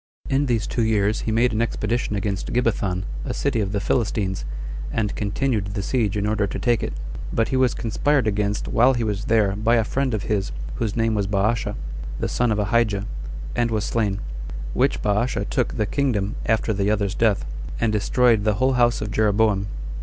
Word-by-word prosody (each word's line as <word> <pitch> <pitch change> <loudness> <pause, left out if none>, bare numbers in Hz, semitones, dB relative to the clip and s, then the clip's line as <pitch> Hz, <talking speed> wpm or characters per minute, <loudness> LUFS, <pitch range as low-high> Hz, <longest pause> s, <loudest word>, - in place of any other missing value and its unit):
In 140 +1 +2
these 115 -4 +1
two 120 - -1
years 110 -1 +2
he - - +1
made 115 +2 +3
an 110 - +1
expedition 115 -1 -1
against 100 -1 -2
Gibbethon, 100 -6 0 0.2
a - - -3
city 140 -5 0
of 95 -2 -1
the 100 - 0
Philistines, 100 - 0 0.5
and 105 -2 -1
continued 105 0 0
the 100 - -2
siege 105 -4 0
in 100 - 0
order 105 -1 +1
to - - -4
take 120 -2 +1
it; - - -3 0.4
but 115 -1 +1
he - - 0
was 130 -2 +3
conspired 135 +3 +1
against 105 -1 0
while 125 +3 +4
he 120 - 0
was 105 -1 -2
there 105 -3 +3
by 110 +3 +2
a 115 - +3
friend 130 +1 0
of 100 - -3
his, 100 -3 -1 0.3
whose 105 - -1
name 115 -1 +1
was 100 -2 0
Baasha, 105 +2 0 0.4
the - - 0
son 120 -2 +1
of 105 - +1
Ahijah, 105 -1 +1 0.5
and 120 -1 +1
was 110 -2 0
slain; 105 -4 0 0.5
which - - +1
Baasha 105 +4 +1
took - - -1
the 105 - +1
kingdom 105 -5 0
after 110 0 +2
the 100 0 0
other's 100 -2 +1
death, 110 -3 +2 0.3
and 115 -2 +1
destroyed 115 +1 +3
the 105 -1 +2
whole 130 +5 +2
house 120 -1 +3
of 105 - -3
Jeroboam. 105 -2 +2
110 Hz, 195 wpm, -23 LUFS, 100-120 Hz, 0.5 s, while